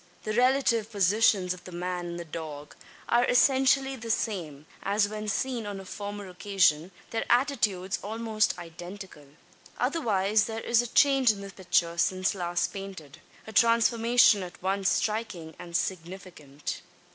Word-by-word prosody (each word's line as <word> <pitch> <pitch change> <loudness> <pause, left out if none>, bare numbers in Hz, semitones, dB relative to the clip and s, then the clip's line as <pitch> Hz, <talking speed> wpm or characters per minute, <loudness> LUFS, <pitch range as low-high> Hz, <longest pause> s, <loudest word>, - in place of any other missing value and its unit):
The 215 - -3
relative 240 -2 +2
positions 200 -2 +3
of 180 - -13
the 185 - -10
man 180 0 -4
and 170 0 -6
the 170 - -6
dog 155 -2 -8 0.3
are 240 +1 +3
essentially 270 +1 +3
the 230 -2 -8
same 165 -11 -2 0.2
as 205 +1 +1
when 215 0 -6
seen 235 0 -2
on 200 -1 -5
a 190 - -10
former 205 0 -6
occasion 180 -3 +1 0.2
their 225 - -1
attitudes 215 -8 +1
almost 220 -1 -1
identical. 175 -2 -10 0.5
Otherwise 220 - +1
there 225 0 -5
is 235 0 +3
a 240 - -5
change 275 0 +4
in 205 -2 +1
the 200 0 -8
picture 170 -3 0
since 185 +3 +1
last 175 -2 -2
painted 190 -8 -9 0.3
a 220 - -10
transformation 230 -1 +4
at 180 -1 -8
once 195 +1 +1
striking 210 -7 -2
and 175 -1 -2
significant. 170 -6 -6
200 Hz, 145 wpm, -28 LUFS, 180-230 Hz, 0.5 s, change